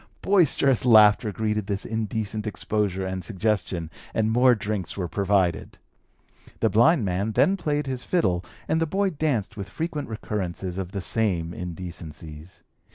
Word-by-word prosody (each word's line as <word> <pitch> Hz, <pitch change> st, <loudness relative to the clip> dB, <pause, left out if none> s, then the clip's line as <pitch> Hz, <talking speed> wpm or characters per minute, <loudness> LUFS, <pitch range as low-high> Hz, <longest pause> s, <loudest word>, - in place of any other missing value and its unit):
Boisterous 150 Hz, -, +3 dB
laughter 110 Hz, -2 st, +6 dB
greeted 105 Hz, 0 st, -2 dB
this 100 Hz, -1 st, -3 dB
indecent 110 Hz, -1 st, -3 dB
exposure 105 Hz, -3 st, -1 dB
and 95 Hz, 0 st, -4 dB
suggestion, 95 Hz, -5 st, -1 dB, 0.2 s
and 110 Hz, 0 st, +1 dB
more 125 Hz, +1 st, +5 dB
drinks 105 Hz, -4 st, -4 dB
were 90 Hz, -3 st, -2 dB
provided. 95 Hz, 0 st, 0 dB, 0.8 s
The -, -, +2 dB
blind 120 Hz, +3 st, +4 dB
man 100 Hz, +4 st, -1 dB
then 190 Hz, -, +4 dB
played 150 Hz, -5 st, -1 dB
his 130 Hz, -2 st, -3 dB
fiddle 95 Hz, -, 0 dB, 0.2 s
and 160 Hz, -, +1 dB
the 165 Hz, -, +1 dB
boy 195 Hz, +3 st, 0 dB
danced 140 Hz, -, -1 dB
with 100 Hz, -1 st, -6 dB
frequent 155 Hz, -, -4 dB
recurrences 95 Hz, -4 st, -4 dB
of 95 Hz, -1 st, -5 dB
the 100 Hz, -2 st, -4 dB
same 90 Hz, -5 st, 0 dB
indecencies. 85 Hz, -2 st, -8 dB
105 Hz, 145 wpm, -25 LUFS, 95-125 Hz, 0.8 s, laughter